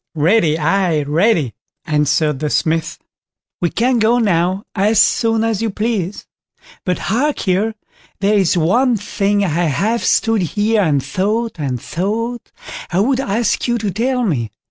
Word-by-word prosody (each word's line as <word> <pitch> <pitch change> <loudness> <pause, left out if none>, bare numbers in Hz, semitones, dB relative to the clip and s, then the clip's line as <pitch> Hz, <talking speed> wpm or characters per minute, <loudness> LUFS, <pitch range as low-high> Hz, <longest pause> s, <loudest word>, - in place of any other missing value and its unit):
"Ready, 160 0 +2
aye, 165 -1 +1
ready", 155 - +1 0.3
answered 150 -2 +1
the 150 - -2
Smith; 160 +1 0 0.6
"we 175 - +1
can 245 +5 +1
go 225 +2 +3
now 185 -3 +1
as 210 +2 +2
soon 225 -1 +2
as 225 -2 -1
you 225 - 0
please; 210 -2 -3 0.6
but 180 -1 -1
hark 270 +7 -1
ye, 200 +4 +1 0.5
there 200 +2 +2
is 190 -3 +2
one 235 +9 +2
thing 205 0 0
I - - -1 0.2
have 205 - 0
stood 225 -2 +2
here 210 +5 +1
and 145 -7 +1
thought, 215 +2 -2
and 130 -4 -2
thought, 225 - -3 0.4
I 180 - 0
would 255 +5 +1
ask 230 -1 0
you 240 0 +1
to 210 -3 -2
tell 250 +6 0
me. 125 - -1
200 Hz, 150 wpm, -17 LUFS, 165-225 Hz, 0.6 s, go